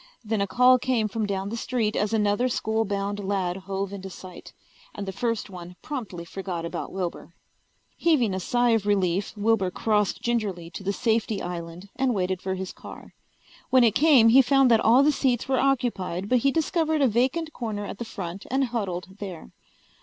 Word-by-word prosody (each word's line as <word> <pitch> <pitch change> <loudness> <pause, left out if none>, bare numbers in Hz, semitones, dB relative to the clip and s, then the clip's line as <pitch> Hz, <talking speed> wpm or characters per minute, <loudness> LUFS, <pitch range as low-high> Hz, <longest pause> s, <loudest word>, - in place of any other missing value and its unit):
Then 215 -1 -1
a 200 - 0
call 250 +3 +5
came 245 -4 0
from 215 +1 -2
down 195 0 -2
the 225 - -4
street 230 -2 -1
as 210 0 0
another 215 +3 +1
school 220 -1 0
bound 200 0 -2
lad 190 -2 -1
hove 195 +1 -4
into 195 -1 -7
sight, 185 0 -11 0.4
and 200 - -5
the - - -2
first 230 +3 -2
one 180 -2 -10
promptly 215 - -5
forgot 180 -2 -5
about 170 - -5
Wilbur. 175 -2 -5 0.6
Heaving 265 - +2
a 190 - -2
sigh 240 +5 +1
of 220 -3 +1
relief, 195 -2 +1
Wilbur 210 -3 +2
crossed 210 +1 0
gingerly 200 -8 -2
to 170 - -7
the 200 - 0
safety 220 -1 0
island 175 +2 -6
and 260 -2 +1
waited 185 -1 -1
for 190 0 -2
his 190 0 -5
car. - - -12 0.6
When 255 -1 +5
it 225 -3 +4
came 270 -5 +6
he 260 +4 +8
found 270 0 +4
that 225 - +6
all 240 +6 +5
the 300 - +4
seats 255 -4 0
were 265 -1 +1
occupied 225 -9 0
but 250 - +4
he 275 +3 +2
discovered 315 -1 +1
a - - +5
vacant 265 +8 0
corner 215 -4 -4
at 200 - -7
the - - -2
front 190 -3 -7
and 270 +2 +1
huddled 195 -6 -4
there. 185 -5 -8
210 Hz, 190 wpm, -25 LUFS, 190-245 Hz, 0.6 s, he